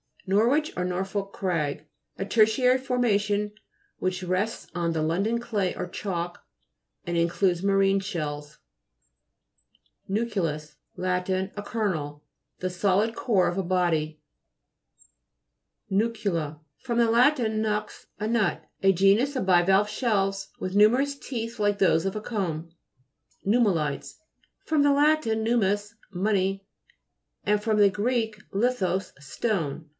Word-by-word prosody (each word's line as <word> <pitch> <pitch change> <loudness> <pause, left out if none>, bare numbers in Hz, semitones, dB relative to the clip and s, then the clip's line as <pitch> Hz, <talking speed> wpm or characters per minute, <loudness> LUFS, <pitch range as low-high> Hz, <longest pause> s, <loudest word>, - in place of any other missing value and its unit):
NORWICH, 235 +11 +2
or 180 - 0
NORFOLK 195 +2 -3
CRAG 155 -5 -2 0.3
A 195 - -3
tertiary 225 +5 +4
formation 210 -5 0 0.5
which 185 0 -2
rests 185 +5 -2
on 170 -1 -1
the 160 - -1
London 195 +9 0
clay 210 -6 -1
or - - -4
chalk, 175 -3 -4 0.6
and 175 0 -2
in 170 0 +3
cludes 175 0 +1
marine 195 0 +3
shells 150 -6 -5 1.5
(p. 195 - -5
84). - - +2 0.4
NU'CLEUS 150 -1 -12 0.2
Lat. 180 0 -1
A 190 +2 -2
kernel. 160 -10 -3 0.4
The 185 - -2
solid 200 +4 +1
core 210 -6 +2
of 175 - -4
a 195 - 0
body. 165 -4 0 1.7
NU'CULA 195 -8 -1 0.2
fr. 250 -3 -4
lat. 235 +5 +4
nux, 215 -3 0 0.3
a 210 - -2
nut. 230 -2 +1 0.2
A 195 0 +5
genus 200 +10 +3
of 255 - -1
bivalve 190 +3 +4
shells 195 -5 0
with 185 +1 -4
nume 210 +4 +6
rous 280 +1 0
teeth 230 -2 -5
like 205 -1 +2
those 180 -3 +3
of 195 - -2
a 215 - -3
comb. 170 -8 -3 0.7
NUMMULI'TES 195 - +1 0.5
fr. 315 - 0
lat. 290 +2 +4
nummus, 220 -2 0 0.2
money, 195 0 0 0.8
and 210 0 +1
fr. 220 0 0
gr. 205 +2 +3 0.4
lithos, 195 -4 0
stone. 160 - -3
195 Hz, 125 wpm, -26 LUFS, 180-220 Hz, 1.7 s, nume